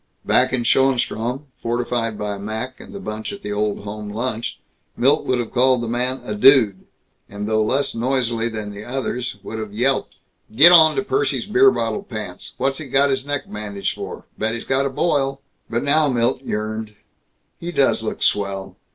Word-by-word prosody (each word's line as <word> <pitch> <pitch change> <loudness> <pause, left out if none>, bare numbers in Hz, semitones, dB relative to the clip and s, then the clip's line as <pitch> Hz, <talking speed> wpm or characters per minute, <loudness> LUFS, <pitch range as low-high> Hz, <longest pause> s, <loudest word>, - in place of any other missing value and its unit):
Back 130 - +3
in 130 -2 0
Schoenstrom, 125 +1 +1 0.2
fortified 120 -1 -1
by 105 -1 -4
Mac 110 +5 -5
and - - -12
the 200 - -7
bunch 110 - -5
at 200 0 -9
the - - -4
Old 105 -1 -1
Home 105 0 -6
Lunch, 115 +1 -3 0.4
Milt 140 +5 +2
would 130 - +2
have 120 -2 -3
called 130 -1 +3
the - - -3
man 125 +3 0
a 105 - -4
"dude," 105 -3 +5 0.4
and 100 +1 -5
though 110 0 +2
less 135 +6 0
noisily 120 -1 0
than 110 -2 -5
the 100 +1 -8
others 125 -2 -3
would 110 +2 -6
have 110 -2 -6
yelped, 130 +4 0 0.4
"Get 160 +8 +9
onto 160 +2 +7
Percy's 410 - 0
beer 400 +1 +5
bottle 210 - -1
pants. 110 - -7
What's 135 +2 -1
he 155 - -7
got 140 +2 +3
his 135 +1 -2
neck 145 -1 -1
bandaged 105 -2 -3
for? - - -8
Bet 110 +1 +1
he's 115 - -6
got 135 +1 +1
a - - -3
boil." 135 -2 0 0.3
But 120 +1 -1
now 145 +1 +3
Milt 125 0 +1
yearned, 110 -2 -4 0.6
"He 170 +1 -5
does 135 -8 +2
look 110 - -4
swell. 100 -1 -1
120 Hz, 185 wpm, -21 LUFS, 110-135 Hz, 0.6 s, Get